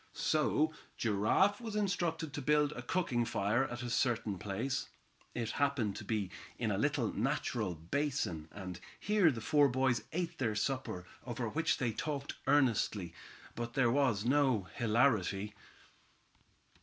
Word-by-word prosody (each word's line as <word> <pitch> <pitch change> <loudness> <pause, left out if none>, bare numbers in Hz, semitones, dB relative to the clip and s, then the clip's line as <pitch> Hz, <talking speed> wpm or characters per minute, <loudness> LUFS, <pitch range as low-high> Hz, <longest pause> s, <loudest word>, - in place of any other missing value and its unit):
So 155 0 +2 0.2
Giraffe 120 - +2
was 225 -3 -5
instructed 170 -7 -1
to 145 - -3
build 150 +1 +3
a 125 - -6
cooking 125 -3 0
fire 115 +3 +1
at 120 -1 -5
a 120 - -3
certain 115 -5 0
place. 115 +8 -2 0.5
It 115 -2 -2
happened 140 -8 0
to - - -6
be 105 -5 -2 0.3
in 110 -3 0
a 95 - 0
little 145 -3 +1
natural 115 - -1
basin, 85 - -2
and 95 -3 -7 0.2
here 205 -4 +4
the 120 -6 -3
four 145 +3 +4
boys 130 -1 +1
ate 170 0 -3
their 115 -5 0
supper, 105 -6 -2 0.2
over 120 -1 -3
which 160 +8 +1
they 120 -3 0
talked 145 +3 -3
earnestly, 115 -10 +2 0.4
but 120 +1 -5
there 125 -4 +4
was 120 -6 +2
no 130 -5 +3
hilarity. 105 -4 +2
125 Hz, 145 wpm, -34 LUFS, 105-145 Hz, 0.5 s, here